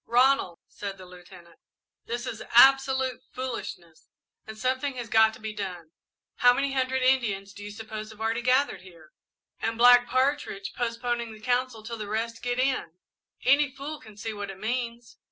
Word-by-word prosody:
"Ronald," 245 -8 +3
said 200 -1 -7
the 185 - -11
Lieutenant, 180 -1 -15 0.5
"this 240 +1 -3
is 225 -3 -5
absolute 265 +1 +5
foolishness, 205 -10 -6 0.4
and 220 0 -8
something 260 +3 -1
has 240 -2 -6
got 220 -1 +5
to - - -14
be 220 0 -5
done. 180 -6 -6 0.5
How 245 0 +6
many 275 +1 0
hundred 260 0 0
Indians 210 -7 +1
do 205 - -10
you 205 - -6
suppose 215 0 -7
have 220 -1 -14
already 225 +1 -1
gathered 255 -4 +2
here 170 -4 -16 0.5
and 225 0 -2
Black 245 +1 +7
Partridge 260 -6 0
postponing 235 -1 -2
the 215 - -13
council 245 0 -1
till 230 +1 -6
the 210 -1 -5
rest 225 +2 -3
get 245 0 -2
in 255 -11 -1 0.5
any 280 +2 +4
fool 280 +3 -7
can 215 -2 -15
see 220 +1 -4
what 205 -1 -6
it 195 - -8
means!" 235 +1 -4
230 Hz, 170 wpm, -27 LUFS, 205-255 Hz, 0.5 s, Black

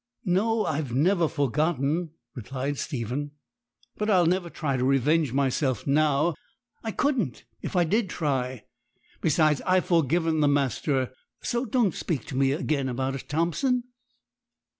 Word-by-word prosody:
'No, 215 +5 +2
I've 145 -4 -2
never 170 +4 +3
forgotten,' 150 +3 0 0.2
replied 135 +4 -4
Stephen, 140 +2 -3 0.6
'but 210 +1 -1
I'll 185 -4 +5
never 175 +1 +1
try 150 -5 -2
to 125 - 0
revenge 135 +2 +2
myself 130 -2 0
now. 150 +3 +2 0.5
I 225 - -2
couldn't 235 - -1 0.2
if - - -5
I 175 - +4
did 200 +4 +1
try. 130 -7 -2 0.6
Besides, 155 -2 +3
I've 185 0 +2
forgiven 165 0 +2
the 150 - +4
master; 135 -2 0 0.3
so 240 +2 -1
don't 220 -6 +1
speak 145 -10 -3
to 130 - -7
me 135 0 +3
again 140 -3 -1
about 130 +2 -2
it, 135 - -7
Thompson.' 170 - +1
150 Hz, 140 wpm, -26 LUFS, 135-175 Hz, 0.6 s, I'll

